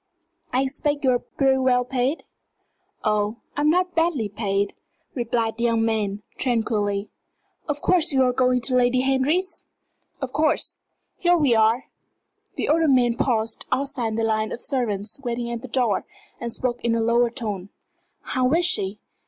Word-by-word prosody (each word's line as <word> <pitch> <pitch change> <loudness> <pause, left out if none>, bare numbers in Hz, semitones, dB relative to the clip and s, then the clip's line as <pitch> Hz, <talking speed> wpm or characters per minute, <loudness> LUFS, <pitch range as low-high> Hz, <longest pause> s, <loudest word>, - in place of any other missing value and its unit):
I 260 +2 +2
expect 290 +2 -2
you're 255 -2 +3
pretty 265 0 +1
well 250 -1 +2
paid?" 260 +4 -1 0.8
"Oh, 210 0 +1 0.2
I'm 290 +1 +2
not 360 +2 +2
badly 325 -10 +1
paid," 200 -1 -1 0.4
replied 235 -2 -1
the 235 - 0
young 230 -1 +2
man, 210 -2 -1 0.2
tranquilly. 215 -5 0 0.6
"Of 290 0 -2
course 350 -3 +3
you're 260 -2 +3
going 250 0 +2
to 245 +2 0
Lady 250 0 +3
Henry's?" 275 +8 0 0.6
"Of 265 -2 -5
course. 305 +2 +1 0.4
Here 350 0 +3
we 285 -7 +3
are." 225 +3 +3 0.7
The - - -2
older 320 +1 +3
man 250 -4 +4
paused 225 -3 -1
outside 255 -4 0
the 225 - 0
line 220 -1 0
of - - -5
servants 215 -5 -1
waiting 240 -2 -3
at 235 -1 -4
the 260 - -8
door, 245 -4 0 0.3
and 235 -1 -4
spoke 245 +1 -2
in 235 -1 +2
a - - +1
lower 235 +1 +3
tone. 210 -6 -4 0.5
"How 255 0 0
is 345 +1 +3
she? 200 - +2
245 Hz, 155 wpm, -23 LUFS, 225-270 Hz, 0.8 s, man